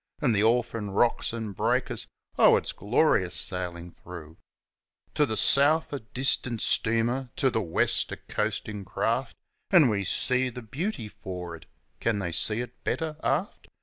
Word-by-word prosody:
An' 145 -6 +2
the 105 -2 +2
orphan 115 -2 +1
rocks 115 +4 +1
an' 110 -2 -5
breakers 95 - -1 0.3
oh, - - +6
it's - - -3
glorious - - +1
sailin' 90 -1 -1
through! 85 -3 -11 0.8
To 150 - +2
the 110 -2 -2
south 150 +3 +4
a 140 - -2
distant 120 0 0
steamer, 120 +3 +2
to 135 -3 +1
the 110 - 0
west 85 -5 +1
a - - -5
coastin' 105 -2 -4
craft, 115 +6 -2 0.3
An' 165 -9 +6
we 100 -2 0
see 130 +6 +1
the 125 0 -9
beauty 135 - -4
for'ard 90 -5 -8 0.3
can 115 -2 0
they 90 -4 -3
see 105 +6 +1
it 125 0 -10
better 160 -2 -2
aft? 160 +9 -2
115 Hz, 150 wpm, -27 LUFS, 100-130 Hz, 0.8 s, oh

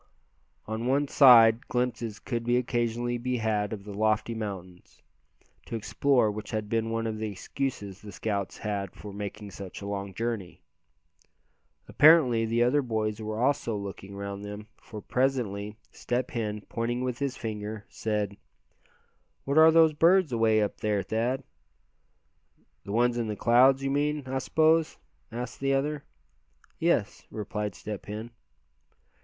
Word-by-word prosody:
On 110 +2 -3
one 140 +2 +2
side 120 -4 +7
glimpses 120 -3 -2
could 120 -2 -4
occasionally 120 0 0
be 125 +1 -1
had 105 -2 0
of 105 -3 -6
the 105 0 -8
lofty 110 +2 +1
mountains, 95 -5 -8 0.6
to - - -4
explore 120 +1 +2
which 105 0 -7
had 110 -1 -3
been 115 +1 -1
one 115 0 -2
of 110 -1 -3
the 110 0 -2
excuses 100 0 -4
the 105 - -10
scouts 100 -3 -3
had 100 -3 -4
for 105 -1 -9
making 105 0 -6
such 95 -1 -8
a 100 - -8
long 100 -1 -4
journey. 115 -5 -4 1.2
Apparently 130 -7 +5
the 115 +1 +2
other 135 +4 +3
boys 110 -3 -2
were 110 0 -4
also 130 -4 +1
looking 100 0 -7
around 100 0 -5
them, 105 +1 -7 0.2
for 105 -2 -9
presently 110 -6 -1
Step 125 +1 -3
Hen, 105 -3 -3
pointing 120 +2 -2
with 125 -1 -3
his 140 -2 -2
finger, 105 -2 -5
said: 105 -2 -3 1.1
"What 140 +3 +3
are 160 0 +9
those 160 -1 +5
birds 170 +1 +4
away 110 -2 +3
up 105 - -3
there, 105 -2 0
Thad?" 115 +6 -1 1.4
"The 100 - -6
ones 120 +2 +2
up - - 0
in 115 - -3
the 105 - -3
clouds, 130 +5 +4
you 135 - 0
mean, 145 +1 0
I 130 +1 -2
suppose?" 160 +3 +2 0.3
asked 120 +1 -6
the 135 0 +1
other. 145 +1 -1 0.8
"Yes," - - 0
replied 105 -2 -4
Step 105 +5 -7
Hen. 110 +3 -6
115 Hz, 150 wpm, -28 LUFS, 105-125 Hz, 1.4 s, are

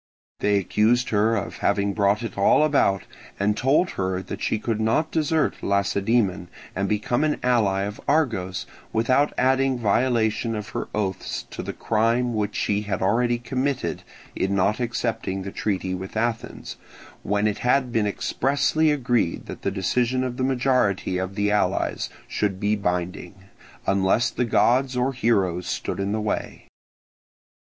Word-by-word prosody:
They 105 0 +2
accused 110 +6 +2
her 110 +2 +2
of 100 - -4
having 100 0 +1
brought 100 +2 +2
it 115 - -5
all 100 +9 +4
about, 135 -10 +2 0.4
and 105 +1 +2
told 140 +10 +2
her 95 0 -2
that - - -7
she - - 0
could 110 0 -2
not 115 +9 +1
desert 160 -1 0
Lacedaemon 100 -1 +1 0.3
and 100 0 -1
become 110 +5 0
the 155 -1 +1
ally 105 -6 +2
of 105 +1 -5
Argos, 115 - 0 0.3
without 130 +6 +2
adding 130 0 +2
violation 115 0 +1
of 105 -1 -5
her - - -4
oaths 95 -3 -2
to - - -5
the - - -4
crime 115 +2 +1
which 105 -2 -2
she 105 0 0
had 100 -3 -3
already 120 +4 +2
committed 125 - -2 0.3
in 95 +1 0
not 100 +4 +2
accepting 115 -5 -2
the 100 - -6
treaty 95 -3 -2
with 95 +3 -5
Athens, 115 0 -3 0.4
when 105 +1 0
it 105 -1 0
had 125 0 +2
been 110 -3 +1
expressly 140 +8 +1
agreed 120 - 0
that - - -8
the - - 0
decision 120 +7 0
of 125 -1 -3
the 130 - -1
majority 125 -8 +1
of 95 +1 -4
the 105 0 +1
allies 105 - 0 0.2
should 100 -3 -1
be 105 +1 +1
binding, 90 -1 -3 0.5
unless 100 +4 +2
the 125 - -1
gods 125 +3 +2
or 130 +2 +1
heroes 95 -8 +1
stood - - -3
in 100 +1 -1
the 110 - 0
way. 105 - -3
110 Hz, 155 wpm, -24 LUFS, 100-125 Hz, 0.5 s, all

